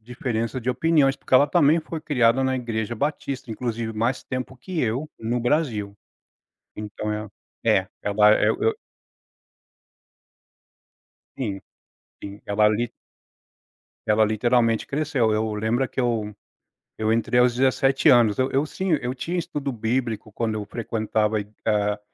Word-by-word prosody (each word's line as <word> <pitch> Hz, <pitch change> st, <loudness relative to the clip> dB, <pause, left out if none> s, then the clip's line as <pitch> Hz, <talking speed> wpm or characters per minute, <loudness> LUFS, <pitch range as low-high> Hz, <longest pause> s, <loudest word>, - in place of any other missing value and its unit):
diferença 120 Hz, +1 st, -3 dB
de 125 Hz, -, -4 dB
opiniões, 135 Hz, +1 st, +3 dB
porque -, -, -17 dB
ela 140 Hz, +3 st, +7 dB
também 150 Hz, +3 st, +4 dB
foi 160 Hz, 0 st, -6 dB
criada 130 Hz, -4 st, +2 dB
na 130 Hz, 0 st, +1 dB
Igreja 115 Hz, -2 st, -3 dB
Batista, 140 Hz, -2 st, -3 dB
inclusive 115 Hz, 0 st, -3 dB
mais 115 Hz, +4 st, -1 dB
tempo 130 Hz, +1 st, -5 dB
que 165 Hz, +7 st, -4 dB
eu, 125 Hz, +6 st, -1 dB
no 120 Hz, +2 st, -1 dB
Brasil. 120 Hz, -7 st, -1 dB, 0.8 s
Então 105 Hz, 0 st, -5 dB
é 105 Hz, -1 st, -5 dB, 0.4 s
é, -, -, +3 dB, 0.2 s
ela 105 Hz, +1 st, +5 dB
é -, -, +3 dB
eu -, -, -1 dB
eu 445 Hz, 0 st, +2 dB, 2.6 s
Sim. 100 Hz, -7 st, -3 dB, 0.6 s
Sim, 100 Hz, +1 st, -8 dB
ela 105 Hz, +1 st, +3 dB
li 115 Hz, +3 st, 0 dB, 1.2 s
ela 110 Hz, 0 st, +4 dB
literalmente 115 Hz, +1 st, +1 dB
cresceu. 140 Hz, -6 st, 0 dB
Eu 110 Hz, 0 st, 0 dB
lembra 115 Hz, +5 st, 0 dB
que -, -, -3 dB
eu 115 Hz, -4 st, -1 dB, 0.7 s
eu 110 Hz, 0 st, +2 dB
entrei 115 Hz, +2 st, +1 dB
aos 125 Hz, 0 st, +4 dB
17 135 Hz, +3 st, +3 dB
anos 120 Hz, -5 st, +5 dB
eu 130 Hz, +1 st, +2 dB
eu 135 Hz, +3 st, +1 dB
sinha 185 Hz, +2 st, 0 dB
eu 125 Hz, +1 st, -2 dB
tinha 170 Hz, +7 st, -4 dB
estudo 145 Hz, -4 st, -3 dB
bíblico, 115 Hz, -1 st, -2 dB
quando 110 Hz, -1 st, -2 dB
eu 105 Hz, -1 st, -4 dB
frequentava 110 Hz, -1 st, -1 dB
e 100 Hz, -, -6 dB, 0.2 s
a 105 Hz, 0 st, +1 dB
120 Hz, 145 wpm, -24 LUFS, 110-135 Hz, 2.6 s, ela